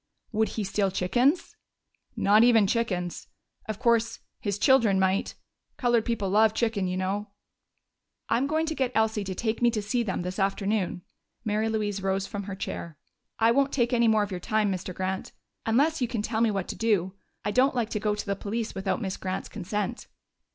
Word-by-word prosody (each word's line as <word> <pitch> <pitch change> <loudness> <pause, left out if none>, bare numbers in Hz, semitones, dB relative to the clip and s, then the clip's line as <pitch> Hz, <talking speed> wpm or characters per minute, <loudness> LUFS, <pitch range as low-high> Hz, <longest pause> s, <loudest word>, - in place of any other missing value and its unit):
"Would 220 0 +2
he 215 - 0
steal 195 0 0
chickens?" 245 - +1 0.6
"Not 210 +3 +5
even 230 -3 +6
chickens.... 190 -5 -1 0.4
Of 215 -2 -3
course, 230 0 +2 0.2
his 200 -2 -2
children 230 -6 +4
might. 190 +1 +1 0.4
Colored 240 -3 +2
people 230 -4 -1
love 215 +1 +4
chicken, 220 -5 0
you 180 0 -2
know." 195 +3 -2 1.0
"I'm 240 +5 +1
going 315 +2 +1
to 320 - -2
get 260 -4 -1
Elsie 220 -1 +2
to 190 -1 -4
take 220 +4 -2
me 240 - +5
to 225 -2 -1
see 210 +4 -1
them 190 -6 -2
this 180 +3 -4
afternoon." 195 -2 0 0.4
Mary 215 +1 0
Louise 210 -2 -1
rose 195 0 0
from 200 -1 -5
her 200 -1 -5
chair. 170 -4 -6 0.4
"I 225 0 +4
won't 275 +2 +2
take 240 -2 +1
any 235 -1 +4
more 220 -1 +4
of 205 - -5
your 180 - -3
time, 215 +2 +1
Mr. 185 0 -4
Grant 190 +1 -3 0.3
unless 285 +7 +2
you 245 - +2
can 230 -3 -3
tell 220 +1 -1
me 230 - +4
what 195 -3 -2
to - - -3
do. 200 -5 +1 0.3
I 205 - +1
don't 260 +4 +3
like 235 -3 -1
to 210 - -1
go 210 0 0
to 210 - -5
the 200 -1 -1
police 215 +3 -3
without 195 +4 -2
Miss 190 -1 -3
Grant's 185 0 -4
consent." 210 +4 -4
215 Hz, 195 wpm, -27 LUFS, 195-230 Hz, 1.0 s, even